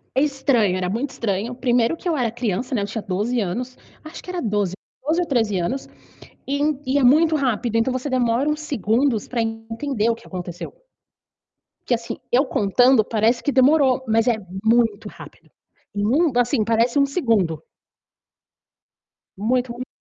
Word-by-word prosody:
É 265 Hz, -, +3 dB
estranho, 265 Hz, -9 st, +1 dB
era 180 Hz, 0 st, -2 dB
muito 240 Hz, +7 st, -2 dB
estranho, 230 Hz, -2 st, -3 dB
primeiro 245 Hz, +3 st, +1 dB
que -, -, -18 dB
eu 335 Hz, -, +2 dB
era 245 Hz, -5 st, 0 dB
criança, 240 Hz, +1 st, -3 dB
né, 210 Hz, -, 0 dB
eu -, -, -2 dB
tinha 220 Hz, +2 st, -4 dB
12 210 Hz, +5 st, -1 dB
anos, 245 Hz, +7 st, -4 dB, 0.3 s
acho 310 Hz, -, -9 dB
que -, -, -18 dB
era 360 Hz, -1 st, -3 dB
12, 205 Hz, -4 st, -1 dB, 0.3 s
12 315 Hz, +5 st, +1 dB
ou -, -, -3 dB
13 225 Hz, -8 st, +1 dB
anos, 250 Hz, +11 st, -3 dB, 0.6 s
e 280 Hz, +1 st, -2 dB, 0.3 s
e 265 Hz, +2 st, +1 dB
é 275 Hz, -, +2 dB
muito 310 Hz, +6 st, +5 dB
rápido 240 Hz, -3 st, 0 dB
então 230 Hz, +3 st, +1 dB
você 255 Hz, +3 st, -3 dB
demora 255 Hz, +2 st, +1 dB
uns 300 Hz, -, -1 dB
segundos 250 Hz, -4 st, 0 dB
para 240 Hz, -2 st, -1 dB
entender 225 Hz, +2 st, -2 dB
o 230 Hz, -, +1 dB
que -, -, -17 dB
aconteceu 175 Hz, -2 st, -7 dB, 1.1 s
que, 245 Hz, -, +2 dB
assim, 230 Hz, 0 st, -4 dB
eu 260 Hz, +4 st, +4 dB
contando 245 Hz, +2 st, +3 dB
parece 225 Hz, +2 st, +1 dB
que 290 Hz, -, 0 dB
demorou, 265 Hz, -1 st, +4 dB
mas 225 Hz, +1 st, +2 dB
é 235 Hz, -, +3 dB, 0.3 s
muito 225 Hz, -2 st, +2 dB
rápido. -, -, -14 dB, 0.4 s
E 205 Hz, -, -2 dB
num 285 Hz, +9 st, +2 dB
assim 240 Hz, -2 st, +2 dB
parece 230 Hz, +4 st, +2 dB
um 280 Hz, -, +4 dB
segundo. 220 Hz, -, 0 dB, 1.8 s
Muito, 245 Hz, +4 st, 0 dB
muito 250 Hz, +2 st, -7 dB
240 Hz, 170 wpm, -22 LUFS, 220-265 Hz, 1.8 s, muito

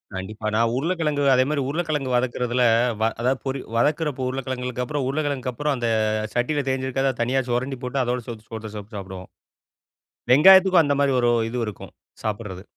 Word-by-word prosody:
கண்டிப்பா. 105 Hz, +3 st, -5 dB
நான் 115 Hz, +1 st, +2 dB
உருளைக்கிழங்கு 150 Hz, -1 st, -1 dB
அதேமாதிரி 135 Hz, +3 st, +2 dB
உருளைக்கிழங்கு 150 Hz, -4 st, -2 dB
வதக்குறதில 125 Hz, 0 st, 0 dB, 0.4 s
வ -, -, +2 dB, 0.2 s
அதா 125 Hz, +2 st, +2 dB
பொறி 135 Hz, 0 st, -2 dB, 0.2 s
வதக்குறப்போ 145 Hz, 0 st, 0 dB
உருளைக்கிழங்கு 125 Hz, -1 st, -3 dB
அப்புறம் 145 Hz, -1 st, -2 dB
உருளைக்கிழங்கு 140 Hz, -3 st, -2 dB
அப்புறம் 145 Hz, +3 st, -1 dB
அந்த 120 Hz, -1 st, -1 dB, 0.5 s
சட்டியில் 135 Hz, +3 st, -1 dB
தேஞ்சுக்கரத 130 Hz, 0 st, -1 dB
தனியா 130 Hz, +3 st, +1 dB
சுரண்டி 125 Hz, +2 st, -2 dB
போட்டு 125 Hz, +2 st, -1 dB
அதோட 125 Hz, +1 st, -1 dB
சோத்த 110 Hz, -2 st, -8 dB
சோத்த 110 Hz, -1 st, -7 dB
போட்டு 105 Hz, +1 st, -9 dB
சாப்பிடுவோம். 95 Hz, -1 st, -8 dB, 1.0 s
வெங்காயத்துக்கும் 185 Hz, +4 st, +7 dB
அந்த 145 Hz, -, +1 dB
மாதிரி 140 Hz, -1 st, +3 dB
ஒரு 120 Hz, -, +3 dB, 0.2 s
இது 125 Hz, -, -4 dB
இருக்கும்.சாப்பிடுறது. 105 Hz, -1 st, -7 dB
130 Hz, 145 wpm, -23 LUFS, 120-145 Hz, 1.0 s, வெங்காயத்துக்கும்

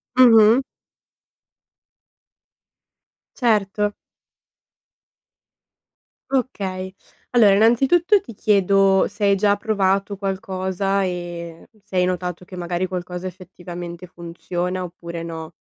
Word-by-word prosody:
Mh-mh. 230 Hz, -1 st, +7 dB, 2.7 s
Certo. 210 Hz, -3 st, +1 dB, 2.4 s
Okay, 190 Hz, -8 st, -2 dB, 0.4 s
allora 220 Hz, -5 st, +5 dB
innanzitutto 275 Hz, -, +4 dB
ti 235 Hz, -, -12 dB
chiedo 195 Hz, -2 st, +3 dB
se 205 Hz, 0 st, -7 dB
hai 200 Hz, 0 st, +4 dB
già 205 Hz, 0 st, +3 dB
provato 200 Hz, -2 st, 0 dB
qualcosa 195 Hz, -1 st, -2 dB
e 175 Hz, -2 st, -6 dB
se 200 Hz, -2 st, -11 dB
hai 180 Hz, -, +3 dB
notato 180 Hz, -1 st, -3 dB
che 185 Hz, 0 st, -11 dB
magari 175 Hz, +1 st, -2 dB
qualcosa 180 Hz, 0 st, -5 dB
effettivamente 175 Hz, -1 st, -9 dB
funziona 175 Hz, +1 st, -4 dB
oppure 170 Hz, -1 st, -7 dB
no. 160 Hz, 0 st, -7 dB
190 Hz, 90 wpm, -21 LUFS, 180-210 Hz, 2.7 s, Mh-mh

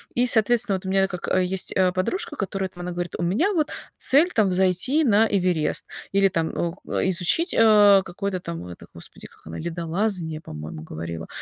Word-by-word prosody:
И, 245 Hz, +1 st, +2 dB
соответственно, 230 Hz, -2 st, +3 dB
вот 185 Hz, -, -13 dB
у -, -, -3 dB
меня 195 Hz, 0 st, +2 dB
как, 180 Hz, -2 st, -6 dB
э, 185 Hz, -, +2 dB
есть, 185 Hz, +1 st, -1 dB
э, 185 Hz, -1 st, +3 dB
подружка, 190 Hz, -, -2 dB
которая 195 Hz, -4 st, -3 dB
там, 175 Hz, -, -12 dB
она 180 Hz, 0 st, -5 dB
говорит: 175 Hz, 0 st, -5 dB
"У -, -, -3 dB
меня 220 Hz, -, +1 dB
вот 310 Hz, -4 st, 0 dB, 0.3 s
цель 300 Hz, +7 st, +6 dB
там- 215 Hz, -3 st, +3 dB
взойти 190 Hz, -, +1 dB
на 225 Hz, -4 st, +4 dB
Эверест". 180 Hz, -6 st, 0 dB, 0.3 s
Или 195 Hz, 0 st, +4 dB
там, 165 Hz, -3 st, -2 dB
о, 170 Hz, -1 st, -1 dB
к -, -, -2 dB
изучить, 185 Hz, -, +1 dB
э, 205 Hz, -3 st, +6 dB
какой-то 195 Hz, +1 st, -4 dB
там, 85 Hz, -, -6 dB
ну 90 Hz, -, -9 dB
это, 85 Hz, -, -11 dB
господи, -, -, -9 dB
как -, -, -20 dB
она, 80 Hz, +1 st, -7 dB
ледолазание, 170 Hz, 0 st, -3 dB
по-моему, 75 Hz, -, -8 dB
говорила. 80 Hz, +1 st, -7 dB
185 Hz, 200 wpm, -23 LUFS, 170-210 Hz, 0.3 s, цель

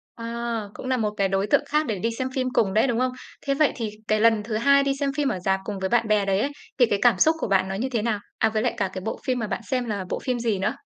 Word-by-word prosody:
À, 235 Hz, 0 st, -3 dB
cũng -, -, -8 dB
là 260 Hz, 0 st, +1 dB
một 215 Hz, -3 st, 0 dB
cái 195 Hz, -1 st, +2 dB
đối 195 Hz, +1 st, 0 dB
tượng 235 Hz, -, +3 dB
khác 300 Hz, +1 st, +1 dB
để 215 Hz, -6 st, -2 dB
đi 230 Hz, +5 st, 0 dB
xem 260 Hz, -, -1 dB
phim 255 Hz, -1 st, 0 dB
cùng 195 Hz, -3 st, +2 dB
đấy, 220 Hz, +4 st, +4 dB
đúng 240 Hz, -3 st, 0 dB
không? 255 Hz, 0 st, +1 dB, 0.3 s
Thế 275 Hz, -, +2 dB
vậy 300 Hz, +1 st, +3 dB
thì 225 Hz, -3 st, -3 dB, 0.2 s
cái 215 Hz, 0 st, +2 dB
lần 225 Hz, -1 st, +4 dB
thứ 215 Hz, 0 st, -3 dB
hai 280 Hz, +5 st, +4 dB
đi 275 Hz, 0 st, +1 dB
xem 280 Hz, -1 st, 0 dB
phim 290 Hz, -2 st, +1 dB
ở 190 Hz, -, -1 dB
rạp 190 Hz, +1 st, 0 dB
cùng 205 Hz, -1 st, -4 dB
với 190 Hz, 0 st, -1 dB
bạn 230 Hz, +1 st, +2 dB
bè 210 Hz, -1 st, +3 dB
đấy 195 Hz, 0 st, +2 dB
ấy, 280 Hz, -, 0 dB, 0.3 s
thì 245 Hz, -, +6 dB
cái 205 Hz, -3 st, 0 dB
cảm 235 Hz, -6 st, +5 dB
xúc 315 Hz, +10 st, +4 dB
của -, -, -2 dB
bạn 190 Hz, -1 st, +2 dB
nó 190 Hz, -, -3 dB
như 235 Hz, +7 st, -2 dB
thế 235 Hz, -5 st, -1 dB
nào? 220 Hz, -2 st, 0 dB, 0.2 s
À, 220 Hz, -, +3 dB
với 215 Hz, 0 st, -1 dB
lại -, -, 0 dB
cả 200 Hz, -5 st, -1 dB
cái 185 Hz, -, -5 dB
bộ 220 Hz, -, -4 dB
phim 255 Hz, -1 st, 0 dB
mà 225 Hz, -, -2 dB
bạn 200 Hz, -, -3 dB
xem 255 Hz, -2 st, +1 dB
là 205 Hz, -5 st, -3 dB
bộ -, -, -2 dB
phim 255 Hz, -2 st, -2 dB
gì 230 Hz, -4 st, 0 dB
nữa? 190 Hz, -, 0 dB
225 Hz, 325 wpm, -24 LUFS, 205-255 Hz, 0.3 s, thì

